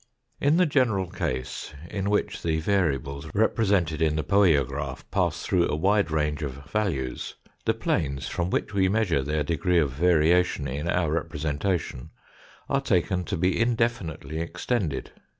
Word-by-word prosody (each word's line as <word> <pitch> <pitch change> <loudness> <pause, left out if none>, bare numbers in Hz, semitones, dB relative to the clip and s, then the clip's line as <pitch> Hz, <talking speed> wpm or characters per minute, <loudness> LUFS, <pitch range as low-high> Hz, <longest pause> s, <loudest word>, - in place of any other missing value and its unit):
In 145 +3 +3
the 180 - +5
general 120 - +1
case, 65 +3 -4 0.2
in 100 0 -2
which 105 0 0
the 80 -1 0
variables 75 -6 0
represented 100 -7 +2
in 80 -1 +2
the 80 - -1
poiograph 95 -8 +2
pass 85 -4 0
through 90 -3 +2
a - - 0
wide 100 +4 +2
range 75 -1 0
of 70 -4 -3
values, 80 -11 -2 0.3
the - - +2
planes 70 -3 -1
from 85 +1 -2
which - - -1
we 95 -1 +3
measure 100 -8 +2
their 75 +2 -1
degrees 85 +3 +2
of 70 - -3
variation 85 0 +3
in 75 +5 -3
our 85 -3 +1
representation 80 -2 -2 0.6
are 135 - +1
taken 90 -6 +1
to - - -2
be 90 +4 +1
indefinitely 115 - -1
extended. 85 - -2
85 Hz, 150 wpm, -26 LUFS, 75-100 Hz, 0.6 s, the